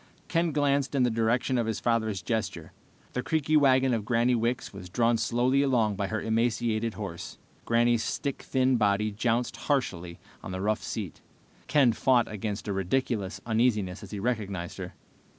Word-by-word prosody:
Ken 165 -1 +1
glanced 140 -1 +1
in 130 - +3
the 125 - +2
direction 120 +3 +1
of 115 - 0
his 110 - -2
father's 110 -5 0
gesture. 110 +2 -3 0.4
The 125 - -1
creaky 155 +1 0
wagon 135 -3 +4
of 110 -3 -1
Granny 120 +3 +2
Wicks 120 0 -1
was 90 -2 -9
drawn 115 +4 +2
slowly 125 +4 +2
along 120 -7 +2
by 100 0 -2
her 110 +2 -2
emaciated 115 0 0
horse. 95 -5 -7 0.3
Granny's 120 0 +3
stick 140 -2 -3
thin 130 -1 +1
body 105 0 +2
jounced 115 +2 -1
harshly 90 - -2 0.2
on - - -7
the 95 - -4
rough 105 +2 0
seat. 95 -3 -5 0.5
Ken 135 -6 +4
fought 125 0 +3
against 105 0 -4
a 100 - -1
ridiculous 95 0 -1
uneasiness 110 -5 +1
as - - -10
he 105 - -5
recognized 100 -6 -3
her. - - -7
115 Hz, 170 wpm, -28 LUFS, 105-125 Hz, 0.5 s, wagon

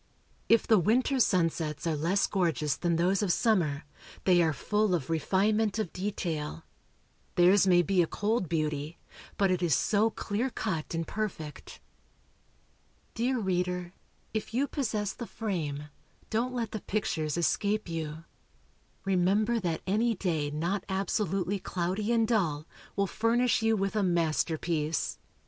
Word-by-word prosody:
If 230 0 +5
the 220 -3 +5
winter 250 - +2
sunsets 165 - +1
are 165 -2 +1
less 170 +7 +1
gorgeous 160 -7 0
than 170 -1 0
those 185 +4 +2
of 200 -4 +1
summer, 170 -10 +1 0.4
they 180 -2 +5
are 160 -2 +3
full 210 +5 +1
of 165 -1 -3
refinement 205 +6 +1
of 215 -6 -2
detail. 165 - -3 0.7
Theirs 185 +3 +5
may 175 -1 +5
be 190 0 +3
a 165 - +1
cold 205 -2 -1
beauty, 155 -1 -2 0.4
but 195 -2 +3
it 180 -1 0
is 170 -6 +3
so 215 - +2
clear 225 +3 -2
cut 170 -10 -3
and 165 0 -1
perfect. 175 -9 -5 1.3
Dear 250 +3 0
reader, 180 -3 -1 0.4
if 220 +1 -3
you 270 +3 +3
possess 215 -9 -2
the 235 - -7
frame, 150 -9 -3 0.4
don't 235 +3 0
let 230 -4 -2
the 215 - -4
pictures 160 -7 -1
escape 205 +5 +1
you. 160 -1 -4 0.8
Remember 195 +5 +2
that 170 -5 -2
any 220 +4 +1
day 160 -6 -1
not 170 +7 -2
absolutely 195 0 -1
cloudy 185 +5 -2
and 230 -1 +3
dull, 165 -10 0 0.3
will 200 - +2
furnish 230 +5 +1
you 225 0 +2
with 195 +1 -1
a 210 - +2
masterpiece. 165 -2 0
185 Hz, 140 wpm, -29 LUFS, 165-215 Hz, 1.3 s, If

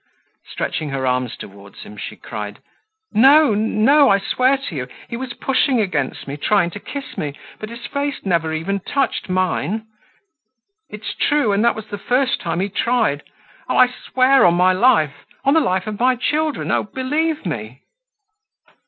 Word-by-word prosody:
Stretching 155 - -3
her 135 -1 -2
arms 125 -1 -1
toward 100 0 -12
him, 105 - -11
she 105 - -7
cried: 105 -1 -7 0.6
"No, 275 +3 +6
no, 225 +7 +4
I 195 - +5
swear 255 +7 +1
to 270 - -7
you. 125 -3 -4 0.2
He - - -5
was 255 0 -5
pushing 265 -1 +1
against 150 -13 -2
me, 140 +1 -5
trying 175 +2 +2
to 205 - -8
kiss 280 +6 -7
me, 145 -2 -3 0.2
but 215 - -7
his 235 +1 -9
face 285 -3 -3
never 165 -4 +1
even 165 +6 -2
touched 270 +1 -2
mine. 185 +3 -1 1.0
It's 210 0 -6
true, 290 -7 +1
and 200 +2 +2
that 235 - +3
was 220 - -7
the 205 -1 -7
first 260 +5 0
time 170 0 -2
he 195 - -1
tried. 220 -8 0 0.5
Oh, - - +1
I 250 - +6
swear 255 +1 +2
on 175 -1 +5
my 185 +1 +4
life, 160 - +2 0.2
on 275 - +4
the 320 - +5
life 185 - 0
of 215 -1 -5
my 255 +1 +3
children, 300 +4 -1
oh, - - +2
believe 295 +7 -2
me!" 125 -6 -5
210 Hz, 170 wpm, -20 LUFS, 160-260 Hz, 1.0 s, No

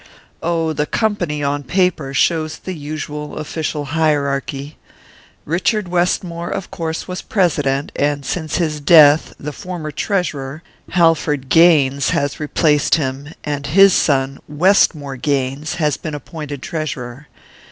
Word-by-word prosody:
"Oh, 165 -1 0
the 150 0 -1
company, 175 -9 -1
on 145 +1 0
paper, 170 -3 0
shows 155 +4 +1
the 185 - -6
usual 150 -1 -6
official 155 -1 -3
hierarchy. 145 -2 -1 0.7
Richard 185 +4 0
Westmore, 175 -1 -1
of 195 -2 -5
course, 160 -1 -4
was 180 -1 -5
president, 145 -8 0
and 145 -1 0
since 155 +3 -3
his 155 -4 -1
death 150 0 +6
the 150 +1 -5
former 175 -5 -6
treasurer 155 -5 -2 0.3
Halford 160 -6 +2
Gaines 140 -5 +4
has 140 0 -1
replaced 150 0 +2
him, 140 -2 -3
and 145 -1 -3
his 195 +5 +6
son, 135 -2 +1
Westmore 150 -4 +2
Gaines, 140 +1 -1
has 150 -4 0
been 155 -2 -5
appointed 145 -2 -7
treasurer. 140 -4 -5
150 Hz, 125 wpm, -18 LUFS, 140-170 Hz, 0.7 s, death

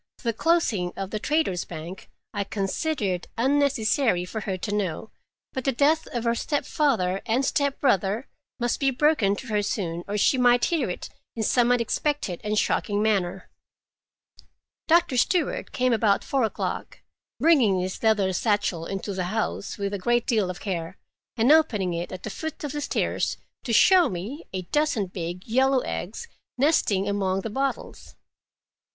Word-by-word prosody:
The 230 -1 0
closing 220 - +1
of 195 -1 -4
the 215 - -2
Traders' 295 - 0
Bank 170 +3 -9 0.2
I 205 -1 -1
considered 200 - -2
unnecessary 260 -6 +2
for 220 +4 -5
her 190 -2 -3
to 205 +3 -4
know, 200 0 -2 0.4
but 260 - -3
the 270 - +2
death 295 +5 +2
of 240 -2 -4
her 235 -1 +2
stepfather 235 -8 0
and 245 +4 +1
stepbrother 260 - +1 0.3
must 240 0 0
be 275 - +3
broken 260 -7 +2
to 260 - -9
her 210 -1 +1
soon, 175 -4 -3
or 205 +1 -2
she 255 +6 +3
might 245 -1 +5
hear 315 - 0
it 180 - -5 0.3
in 225 - -2
some 245 +2 +3
unexpected 245 - 0
and 210 0 -1
shocking 205 0 +1
manner. 195 -4 0 1.4
Doctor 325 -6 +3
Stewart 370 - +1
came 255 -1 +1
about 215 -3 +2
four 270 -4 +1
o'clock, 220 - -4 0.4
bringing 255 - +4
his 185 +1 -4
leather 210 -4 +2
satchel 205 -4 0
into 195 +1 -4
the 185 -1 -2
house 215 +1 -3
with 200 -1 -3
a 200 - -2
great 240 +5 +1
deal 215 -6 +1
of 180 - -5
care, 180 -2 -4 0.4
and 235 +5 +4
opening 225 - +3
it 170 +1 -4
at 185 - -7
the 215 - -4
foot 315 +5 -6
of 295 - -3
the 295 - -3
stairs 285 - -1 0.3
to 245 - -2
show 360 - +6
me 210 - -6
a 185 -1 -4
dozen 295 - 0
big 180 0 -6
yellow 260 +3 +3
eggs 215 - -5 0.3
nesting 230 -9 +2
among 195 -1 0
the 220 - -5
bottles. 270 +4 -4
220 Hz, 160 wpm, -25 LUFS, 190-270 Hz, 1.4 s, show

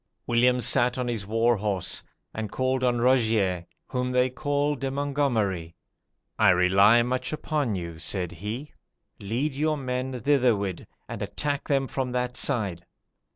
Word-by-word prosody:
"William 125 +1 +3
sat 125 +1 +3
on 125 -1 -2
his 110 -5 -3
war 115 +2 +2
horse, 100 -3 -2 0.3
and 110 -2 -4
called 130 0 0
on 120 -1 +2
Rogier, 110 -8 +2 0.2
whom 125 0 -2
they 125 0 +2
call 145 +2 0
De 135 -1 -3
Mongomeri. 125 - -1 0.6
'I - - +6
rely 95 +6 +5
much 125 +1 -2
upon 150 -7 -1
you,' 85 -3 -6
said 90 +1 -2
he: 105 - -6 0.5
'lead 120 +9 -2
your 155 +2 0
men 130 -1 -3
thitherward, 120 -9 +1 0.2
and - - -6
attack 140 +8 -2
them 135 -2 +2
from 130 -1 -3
that 125 0 -1
side. 100 - 0
125 Hz, 145 wpm, -26 LUFS, 100-130 Hz, 0.6 s, I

